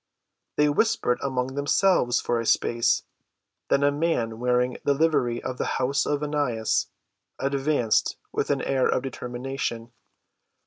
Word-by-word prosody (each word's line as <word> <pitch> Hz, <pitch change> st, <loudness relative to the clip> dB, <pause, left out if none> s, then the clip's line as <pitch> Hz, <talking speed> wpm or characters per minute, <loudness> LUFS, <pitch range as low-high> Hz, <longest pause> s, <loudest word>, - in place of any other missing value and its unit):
They 150 Hz, -, +4 dB
whispered 145 Hz, -, +1 dB
among 130 Hz, -1 st, -2 dB
themselves 145 Hz, -2 st, +2 dB
for 120 Hz, -, -1 dB
a 115 Hz, -, -3 dB
space, 115 Hz, 0 st, +2 dB, 0.7 s
then 140 Hz, -, +3 dB
a 145 Hz, -, +4 dB
man 140 Hz, -8 st, -1 dB
wearing 125 Hz, 0 st, +1 dB
the 140 Hz, -, +2 dB
livery 135 Hz, -6 st, +1 dB
of 130 Hz, -1 st, -5 dB
the -, -, 0 dB
house 130 Hz, +2 st, 0 dB
of 145 Hz, 0 st, -1 dB
Annas 145 Hz, -7 st, 0 dB, 0.5 s
advanced 135 Hz, -4 st, +1 dB
with -, -, -2 dB
an -, -, 0 dB
air 130 Hz, -1 st, +1 dB
of 130 Hz, -, 0 dB
determination. 125 Hz, -2 st, -4 dB
130 Hz, 135 wpm, -25 LUFS, 120-145 Hz, 0.7 s, They